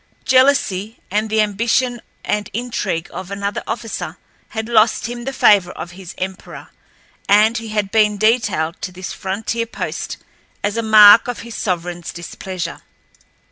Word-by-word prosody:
Jealousy 255 -6 +3
and 215 +2 0
the 220 0 +3
ambition 230 +4 0 0.2
and 210 -1 -1
intrigue 210 -7 -2
of 185 - -7
another 200 0 -3
officer 225 -1 -4 0.3
had 220 -1 -4
lost 225 -1 +3
him 240 0 -5
the 270 - -2
favor 205 -8 +4
of 175 - -7
his 185 0 -10
emperor, 185 0 -6 0.6
and 215 +3 +5
he 230 - -8
had 210 -2 -2
been 210 -1 +3
detailed 210 -7 +1
to 185 - -4
this 180 0 -7
frontier 220 +4 -3
post - - -5 0.5
as 205 +1 0
a 230 - 0
mark 215 0 +8
of 245 -2 -4
his 235 0 -9
sovereignl's 175 -3 -3
displeasure. 170 0 -6
210 Hz, 145 wpm, -19 LUFS, 190-230 Hz, 0.6 s, mark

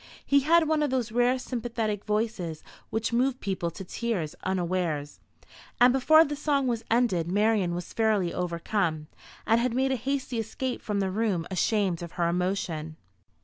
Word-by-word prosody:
He 280 - +4
had 320 +3 +4
one 310 -1 +2
of 295 - +1
those 255 -4 -1
rare 245 +2 +3
sympathetic 230 -4 -3
voices 210 -7 -2 0.3
which 220 +1 -2
move 255 +2 +1
people 185 -3 -2
to 190 +4 -8
tears 190 -5 -3
unawares, 175 -5 -2 0.6
and 245 +1 +6
before 315 +5 +6
the 295 - -3
song 285 -2 0
was 235 -3 -1
ended 205 -8 +1
Marian 205 -3 +2
was 175 - -6
fairly 215 -6 +1
overcome, 170 -2 -1 0.4
and 225 +1 +3
had 245 -1 0
made 265 +1 +2
a - - +2
hasty 260 -1 -2
escape 245 +3 -3
from 205 -2 -1
the 190 -1 -1
room 200 -5 0
ashamed 190 -2 +1
of 170 0 -7
her 170 -1 0
emotion. 170 -3 -2
215 Hz, 165 wpm, -27 LUFS, 180-250 Hz, 0.6 s, and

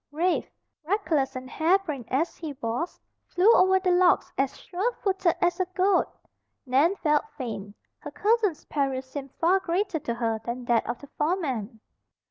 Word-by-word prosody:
Rafe, 340 +4 0 0.3
reckless 315 -7 0
and 255 0 -6
harebrained 315 - 0
as 305 +6 0
he 315 -4 -6
was, 260 +5 -3 0.3
flew 395 +6 +4
over 380 -1 +5
the 370 -1 +1
logs 360 0 +3
as 270 0 -1
sure 390 +7 -2
footed 380 -6 0
as 350 0 0
a 370 - +2
goat. 375 0 +3 0.6
Nan 280 +9 +3
felt 300 -3 +1
faint. 215 -6 -6 0.2
Her - - -7
cousin's 420 -6 +1
peril 270 -3 -1
seemed 270 0 -8
far 360 +4 +3
greater 375 -1 -1
to 235 - -3
her 225 -2 -1
than 240 +2 -5
that 235 -1 +1
of 240 - -2
the 285 - -11
foreman. 265 - -1
315 Hz, 160 wpm, -26 LUFS, 260-370 Hz, 0.6 s, over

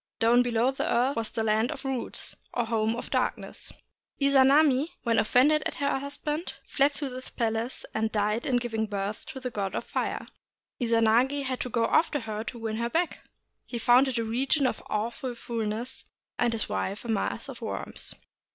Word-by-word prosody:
Down 235 +2 +5
below 240 +1 +2
the 270 - -2
earth 250 +4 +2
was 225 -1 -1
the 225 - -2
Land 220 +2 +2
of 285 -3 -6
Roots, 265 -2 -3 0.2
or 240 - +1
Home 225 0 +1
of 240 - -7
Darkness. - - -2 0.5
Izanami, 280 +1 +5 0.2
when 230 -2 +3
offended 280 +7 +4
at - - -6
her 280 -1 0
hus 280 +1 -5
band, 305 +3 -3
fled 275 +1 +3
into 285 -1 -3
this 255 +1 -7
place, 230 +1 -2
and 220 0 0
died 210 +2 0
in 260 - +2
giving 225 -2 -1
birth 205 0 -4
to 265 - -7
the 255 -1 -4
god 200 -3 -2
of - - -2
fire. - - -2 0.5
Izanagi 235 +4 +3
had 255 -1 -2
to 250 - -3
go 230 -1 +1
after 295 +2 +2
her 215 -1 -4
to 240 - -6
win 220 -1 -3
her 235 +1 -1
back. 335 +5 0 0.5
He 240 - -4
found 245 +3 +5
it 255 -2 -1
a 230 - +1
region 265 +6 +1
of 250 - 0
awful 235 +4 -2
foulness, 230 +2 -3 0.3
and 240 -1 +3
his 225 -2 -2
wife 190 - -3
a - - -5
mass 220 -3 -1
of - - -9
worms. - - -1
240 Hz, 190 wpm, -28 LUFS, 225-265 Hz, 0.5 s, Down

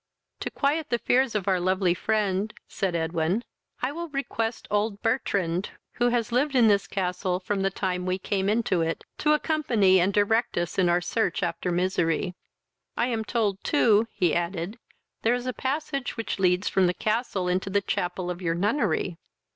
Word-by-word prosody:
"To - - -3
quiet 295 +2 0
the 240 - +2
fears 250 0 +2
of 200 -3 -1
our 190 -2 +3
lovely 185 0 +2
friend, 210 +1 0 0.2
(said 190 -3 -2
Edwin,) 165 +5 0 0.4
I 255 - +1
will 340 +2 -5
request 240 -5 -3
old 205 0 0
Bertrand, 200 -7 0 0.3
who 245 0 +3
has 240 -1 0
lived 270 +4 +1
in 240 -3 +6
this 200 -2 +3
castle 180 -1 -1
from 195 +1 -2
the 195 - +2
time 185 -2 -2
we 185 0 +1
came 195 +1 -1
into 210 -5 +1
it, 165 0 -2 0.2
to 300 0 +3
accompany 245 - +3
and 185 +3 +3
direct 215 +4 +2
us 175 +2 -1
in 180 -2 +4
our 175 +1 +3
search 185 0 -1
after 175 +1 -2
misery. 180 0 0 0.6
I 240 - +1
am 225 -2 -1
told 210 -3 -1
too, 225 -7 +4
(he 175 -4 +1
added,) 175 +5 -2 0.4
there 230 +2 +3
is 245 0 -4
a 255 - -2
passage 275 -1 -3
which 230 -3 -3
leads 180 0 +2
from 190 -2 +3
this 175 - 0
castle 215 -4 -1
into 185 +2 0
the 200 +1 +2
chapel 180 -1 -2
of 180 +1 -7
your 165 -2 0
nunnery. 195 - 0
200 Hz, 180 wpm, -26 LUFS, 180-235 Hz, 0.6 s, in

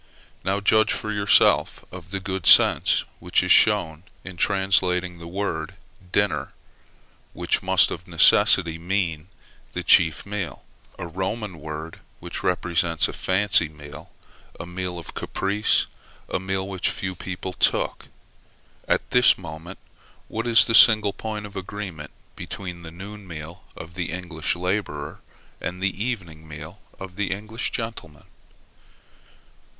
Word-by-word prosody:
Now, 95 +1 0
judge 110 +2 +4
for 110 - -4
yourself 105 -1 +3
of 90 -1 -10
the 95 +1 -3
good 95 -2 -4
sense - - +6 0.2
which - - +1
is - - +1
shown 90 -7 +4 0.2
in 95 -1 -9
translating 95 -1 +1
by 85 - -16
the 85 - -9
word 90 -2 -4 0.4
dinner, 100 +1 0 0.8
which - - 0
must - - +4
of - - -6
necessity 80 -1 +5
mean 85 -3 -2 0.5
the - - -4
chief 80 -3 +4
meal 100 -3 -5 0.3
a - - -6
Roman 95 +2 -4
word 80 +1 -7 0.2
which - - -6
represents 85 -2 +1
a - - -7
fancy 95 -3 +1
meal, 75 0 -12 0.5
a 85 - -5
meal 90 0 -5
of 85 - -8
caprice, 100 +2 0 0.4
a - - -2
meal 95 +1 -3
which 95 -2 -1
few 95 0 -4
people 95 +1 -6
took. - - 0 0.8
At - - +1
this 125 0 +5
moment, 85 +1 -9 0.5
what 115 +2 -4
is 115 -1 +6
the 115 - -1
single 110 -3 +7
point 105 -1 -5
of 100 - -11
agreement 95 -5 -6 0.3
between 90 -3 -7
the 80 - -9
noon 100 +4 -10
meal 85 +2 -9
of 85 - -10
the 90 -2 -4
English 85 -3 -3
laborer 90 -5 -3 0.4
and 90 +1 -4
the 95 +2 -2
evening 85 -10 -5
meal 80 +5 -10 0.2
of 95 -1 -9
the 100 -2 -1
English 110 +4 -3
gentleman? 115 - -6
95 Hz, 140 wpm, -24 LUFS, 85-100 Hz, 0.8 s, single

